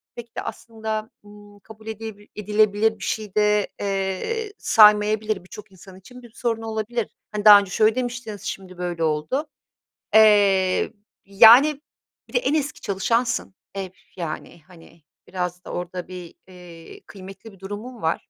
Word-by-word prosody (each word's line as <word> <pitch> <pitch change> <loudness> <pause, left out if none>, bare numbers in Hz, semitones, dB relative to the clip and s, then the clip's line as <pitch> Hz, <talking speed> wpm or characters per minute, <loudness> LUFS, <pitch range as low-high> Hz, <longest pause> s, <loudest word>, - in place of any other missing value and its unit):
pek 235 -1 -11
de - - -2
aslında, 220 -1 -6 0.2
ımm, 205 0 -16
kabul 220 +2 -15
edilebil 220 -1 -8
edilebilir 210 +1 +1
bir - - -9
şey 215 -3 -4
de, 210 -1 +2
eee, 200 - -3
saymayabilir, 210 -2 +4
birçok 210 +3 -12
insan 190 0 -15
için 250 +6 -14
bir 240 -2 -15
sorun 230 -2 -2
olabilir. 225 0 -3 0.2
Hani, 210 0 -4
"Daha 205 -1 +10
önce 200 -2 -6
şöyle 215 +3 +3
demiştiniz, 245 -4 -5
şimdi 185 -2 -7
böyle 175 -2 -3
oldu." 155 - -1 0.7
Eee 200 -4 +4 0.3
yani 240 +9 +6 0.5
bir - - -19
de - - +3
en - - -1
eski 295 -2 -2
çalışansın, 230 +2 -1 0.2
e, 195 -1 -3
üf, 185 - -27
yani. 165 0 -6
Hani 165 -2 -18 0.2
biraz 180 -1 -4
da - - -9
orada 180 0 -5
bir, 180 -2 -10
eee, 175 -3 -13
kıymetli 195 +3 -12
bir 195 - -19
durumun 210 +5 -8
var. 160 +1 -2
210 Hz, 150 wpm, -22 LUFS, 185-225 Hz, 0.7 s, Daha